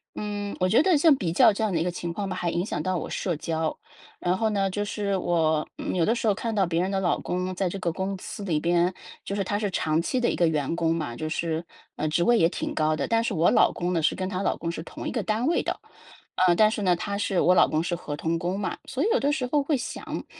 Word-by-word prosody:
嗯 205 Hz, -1 st, -4 dB
我 185 Hz, -, +2 dB
觉 225 Hz, +9 st, +5 dB
得 370 Hz, -1 st, +4 dB
像 300 Hz, 0 st, +6 dB
比 180 Hz, -10 st, -2 dB
较 200 Hz, +6 st, +6 dB
这 210 Hz, -, -2 dB
样 215 Hz, -, +1 dB
的 165 Hz, -, +1 dB
一 -, -, +1 dB
个 180 Hz, -, 0 dB
情 170 Hz, -1 st, -4 dB
况 200 Hz, +3 st, -3 dB
吧 185 Hz, -, -3 dB
还 175 Hz, -1 st, -1 dB
影 175 Hz, -, 0 dB
响 -, -, -3 dB
到 185 Hz, -1 st, 0 dB
我 -, -, -5 dB
社 175 Hz, -3 st, -2 dB
交。 160 Hz, 0 st, -2 dB, 0.4 s
然 180 Hz, +1 st, 0 dB
后 220 Hz, +2 st, +1 dB
呢， 195 Hz, -2 st, +1 dB
就 205 Hz, +2 st, -2 dB
是 205 Hz, -1 st, -2 dB
我 160 Hz, -4 st, +1 dB, 0.3 s
有 170 Hz, -3 st, +2 dB
的 225 Hz, -, +3 dB
时 235 Hz, -, -2 dB
候 205 Hz, -, +3 dB
看 230 Hz, +3 st, -3 dB
到 200 Hz, -3 st, +2 dB
别 170 Hz, 0 st, 0 dB
人 185 Hz, +2 st, -1 dB
的 195 Hz, -, 0 dB
老 180 Hz, -2 st, +1 dB
公 180 Hz, +1 st, -2 dB
在 185 Hz, 0 st, 0 dB
这 195 Hz, -, -5 dB
个 175 Hz, -2 st, -1 dB
公 190 Hz, +2 st, -2 dB
司 205 Hz, -, -7 dB
里 165 Hz, -6 st, 0 dB
边， 175 Hz, +2 st, +2 dB, 0.3 s
就 -, -, -5 dB
是 200 Hz, -, 0 dB
他 205 Hz, -, -1 dB
是 205 Hz, -2 st, -2 dB
长 160 Hz, -2 st, +1 dB
期 250 Hz, +9 st, -1 dB
的 240 Hz, -, +2 dB
一 -, -, -1 dB
个 175 Hz, -, +3 dB
员 155 Hz, 0 st, 0 dB
工 165 Hz, -1 st, +1 dB
嘛， 150 Hz, -8 st, -3 dB
就 155 Hz, +6 st, -4 dB
是， 165 Hz, 0 st, -2 dB, 0.3 s
嗯， 155 Hz, -, -1 dB
职 155 Hz, +3 st, +1 dB
位 240 Hz, +5 st, +4 dB
也 165 Hz, -5 st, +4 dB
挺 -, -, -4 dB
高 155 Hz, 0 st, +2 dB
的。 -, -, -1 dB
但 230 Hz, 0 st, +2 dB
是 230 Hz, -, -1 dB
我 165 Hz, -1 st, +3 dB
老 -, -, +5 dB
公 175 Hz, +1 st, -2 dB
呢 165 Hz, -, +1 dB
是 155 Hz, -, +2 dB
跟 185 Hz, -, -3 dB
她 185 Hz, 0 st, -3 dB
老 -, -, 0 dB
公 165 Hz, -, -4 dB
是 165 Hz, -, -6 dB
同 -, -, -7 dB
一 -, -, -2 dB
个 235 Hz, -, -1 dB
单 220 Hz, +5 st, 0 dB
位 340 Hz, -, +2 dB
的， -, -, -3 dB, 0.7 s
呃， 175 Hz, -, +6 dB
但 215 Hz, +3 st, +5 dB
是 220 Hz, -, -3 dB
呢， 180 Hz, -2 st, +3 dB
他 200 Hz, +3 st, -3 dB
是 200 Hz, -3 st, 0 dB
我 180 Hz, -, +5 dB
老 -, -, +6 dB
公 155 Hz, +1 st, +1 dB
是 175 Hz, 0 st, -1 dB
合 150 Hz, -4 st, -6 dB
同 165 Hz, +2 st, -1 dB
工 180 Hz, +3 st, -2 dB
嘛。 200 Hz, -, -3 dB
所 270 Hz, +1 st, -2 dB
以 -, -, +2 dB
有 -, -, +3 dB
的 285 Hz, +1 st, +2 dB
时 270 Hz, -4 st, -1 dB
候 290 Hz, +3 st, +2 dB
会 285 Hz, 0 st, +1 dB
想， 250 Hz, -, -5 dB
185 Hz, 315 characters per minute, -26 LUFS, 170-210 Hz, 0.7 s, 像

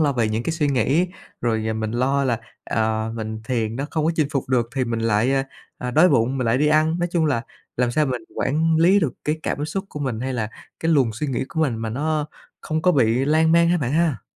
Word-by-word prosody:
lo 145 Hz, -3 st, +3 dB
về 115 Hz, -4 st, +1 dB
những 110 Hz, +2 st, -1 dB
cái 165 Hz, -, -2 dB
suy 160 Hz, -2 st, 0 dB
nghĩ 140 Hz, +7 st, +2 dB, 0.3 s
rồi 110 Hz, -2 st, 0 dB
mình 110 Hz, 0 st, -3 dB
lo 135 Hz, +4 st, +1 dB
là, 120 Hz, -3 st, 0 dB, 0.2 s
ờ, 110 Hz, 0 st, -1 dB
mình 110 Hz, -1 st, -5 dB
thiền 115 Hz, -2 st, -1 dB
nó 140 Hz, +2 st, -3 dB
không 155 Hz, -2 st, -1 dB
có 165 Hz, -, +3 dB
chinh 155 Hz, -3 st, +1 dB
phục 135 Hz, -4 st, -2 dB
được 120 Hz, -3 st, +1 dB
thì 130 Hz, -1 st, +1 dB
mình 115 Hz, -1 st, -2 dB
lại, 115 Hz, +3 st, +2 dB, 0.5 s
ờ, 125 Hz, -, -3 dB
đói 160 Hz, +8 st, +5 dB
bụng 125 Hz, +1 st, +2 dB
mình 125 Hz, -, -1 dB
lại 115 Hz, +3 st, +2 dB
đi 150 Hz, -, +2 dB
ăn. 155 Hz, +2 st, +3 dB
Nói 175 Hz, 0 st, 0 dB
chung 165 Hz, -3 st, +2 dB
là 120 Hz, -6 st, 0 dB, 0.3 s
làm 125 Hz, -1 st, +1 dB
sao 150 Hz, +3 st, +2 dB
mình 125 Hz, -3 st, -3 dB
quản 160 Hz, +3 st, +1 dB
lý 180 Hz, +5 st, +5 dB
được 145 Hz, -9 st, 0 dB
cái 150 Hz, +1 st, 0 dB
cảm 145 Hz, -, -2 dB
xúc 190 Hz, +6 st, -3 dB
của 150 Hz, -, -7 dB
mình 125 Hz, -5 st, -2 dB
hay 130 Hz, +1 st, -2 dB
là 110 Hz, -4 st, -2 dB, 0.3 s
cái 165 Hz, 0 st, +2 dB
luồng 130 Hz, -7 st, +3 dB
suy 115 Hz, +8 st, -3 dB
nghĩ 130 Hz, -1 st, -1 dB
của 160 Hz, -, -3 dB
mình 135 Hz, -7 st, +1 dB
mà 110 Hz, 0 st, -4 dB
nó 150 Hz, +4 st, -1 dB, 0.3 s
không 155 Hz, 0 st, -2 dB
có 180 Hz, -, +4 dB
bị 125 Hz, 0 st, +2 dB
lan 160 Hz, +2 st, +3 dB
man 170 Hz, 0 st, +5 dB
ha 175 Hz, -, +3 dB
bạn 135 Hz, -2 st, -2 dB
ha? 160 Hz, -4 st, +1 dB
135 Hz, 255 wpm, -22 LUFS, 115-155 Hz, 0.5 s, đói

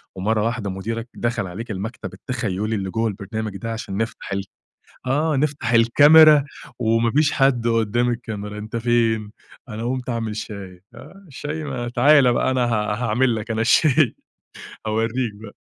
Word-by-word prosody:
ومرَّة 105 Hz, +3 st, 0 dB
واحدة 115 Hz, -3 st, -2 dB
مديرك 115 Hz, +5 st, -5 dB
دخَل 120 Hz, -4 st, -2 dB
عليك 110 Hz, +6 st, -7 dB
المكتب 105 Hz, +4 st, -6 dB
التخيلي 110 Hz, -3 st, -3 dB
اللي 95 Hz, -2 st, -3 dB
جوّا 115 Hz, +1 st, 0 dB
البرنامج 105 Hz, 0 st, -5 dB
ده 115 Hz, +2 st, -5 dB
عشان 100 Hz, -4 st, -5 dB
نفتَح 115 Hz, -2 st, -4 dB
ال 100 Hz, 0 st, -2 dB, 0.6 s
آه، 150 Hz, +4 st, +1 dB
نفتَح 140 Hz, -5 st, -1 dB
الكاميرا، 145 Hz, +6 st, +7 dB, 0.4 s
وما 115 Hz, 0 st, +2 dB
فيش 145 Hz, +3 st, +3 dB
حد 130 Hz, -4 st, +2 dB
قُدَّام 115 Hz, +1 st, +1 dB
الكاميرا، 105 Hz, -3 st, -5 dB
أنتَ 110 Hz, +2 st, -7 dB
فين؟ 115 Hz, -2 st, +1 dB, 0.4 s
أنا 110 Hz, 0 st, -5 dB
قُمت 125 Hz, +1 st, -3 dB
أعمَل 115 Hz, -2 st, -3 dB
شاي. 95 Hz, -4 st, -8 dB
آه 195 Hz, +1 st, -14 dB
الشاي 150 Hz, +2 st, -6 dB
ما 130 Hz, -5 st, -4 dB
تعالَ 130 Hz, +1 st, +5 dB
بقى، 130 Hz, -, +1 dB
أنا 125 Hz, -2 st, +1 dB
ها 105 Hz, -3 st, 0 dB
هاعمَل 120 Hz, +2 st, +2 dB
لك 110 Hz, +1 st, -5 dB
أنا 110 Hz, -, -1 dB
الشاي، 130 Hz, +3 st, +3 dB, 0.7 s
هاوريك 115 Hz, +2 st, -1 dB
بقى 105 Hz, -, -10 dB
115 Hz, 155 wpm, -22 LUFS, 110-125 Hz, 0.7 s, الكاميرا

